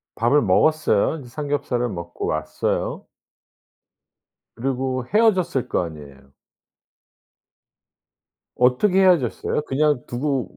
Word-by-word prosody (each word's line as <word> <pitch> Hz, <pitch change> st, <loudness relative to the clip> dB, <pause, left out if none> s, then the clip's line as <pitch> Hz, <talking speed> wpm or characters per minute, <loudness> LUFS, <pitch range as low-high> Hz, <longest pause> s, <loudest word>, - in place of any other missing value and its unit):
밥을 120 Hz, +6 st, +3 dB
먹었어요. 150 Hz, +5 st, +2 dB
이제 125 Hz, -4 st, -12 dB
삼겹살을 140 Hz, -3 st, -2 dB
먹고 85 Hz, -3 st, -6 dB
왔어요. 75 Hz, 0 st, -2 dB, 1.5 s
그리고 130 Hz, 0 st, -2 dB
헤어졌을 185 Hz, -, +2 dB
거 90 Hz, -, 0 dB
아니에요. 70 Hz, -4 st, -12 dB, 2.2 s
어떻게 155 Hz, +11 st, +3 dB
헤어졌어요? 165 Hz, -, +2 dB
그냥 145 Hz, -1 st, +1 dB
두고 130 Hz, -2 st, -3 dB
130 Hz, 235 characters per minute, -22 LUFS, 110-150 Hz, 2.2 s, 밥을